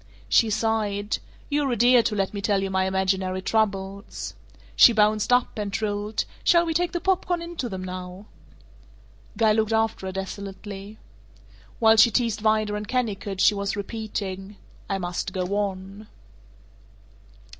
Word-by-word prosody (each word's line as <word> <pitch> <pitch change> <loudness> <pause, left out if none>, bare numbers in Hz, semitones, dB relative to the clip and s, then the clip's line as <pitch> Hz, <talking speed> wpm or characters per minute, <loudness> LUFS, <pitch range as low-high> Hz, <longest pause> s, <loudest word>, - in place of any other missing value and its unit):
She 220 - +4
sighed, 215 -1 -1 0.3
"You're 290 -2 0
a - - +1
dear 240 +2 +5
to 220 -1 -1
let 195 -1 -1
me 200 - -4
tell 200 -1 +1
you 195 - -3
my 190 0 +1
imaginary 190 0 0
troubles." 200 -2 -2 0.4
She 235 - +8
bounced 215 0 +2
up, 245 -3 +2
and 205 -1 -3
trilled, 210 +1 -2 0.2
"Shall 340 -1 +4
we 325 - -1
take 350 +1 0
the 345 - -2
pop 380 +1 0
corn 355 -1 0
in 340 +1 -7
to 245 - -2
them 190 -2 -5
now?" 185 +1 -7 1.1
Guy 220 -1 +4
looked 220 0 +1
after 220 -3 0
her - - -3
desolately. 195 +2 -7 0.8
While 220 -2 +5
she 225 +2 +8
teased 230 -1 0
Vida 215 -1 +1
and 210 0 -4
Kennicott 205 -6 -2
she - - +6
was 200 0 -2
repeating, 200 -2 -5 0.3
"I 195 - 0
must 180 +1 -4
go 185 -2 -1
on." 200 +1 -4
210 Hz, 155 wpm, -25 LUFS, 195-225 Hz, 1.1 s, She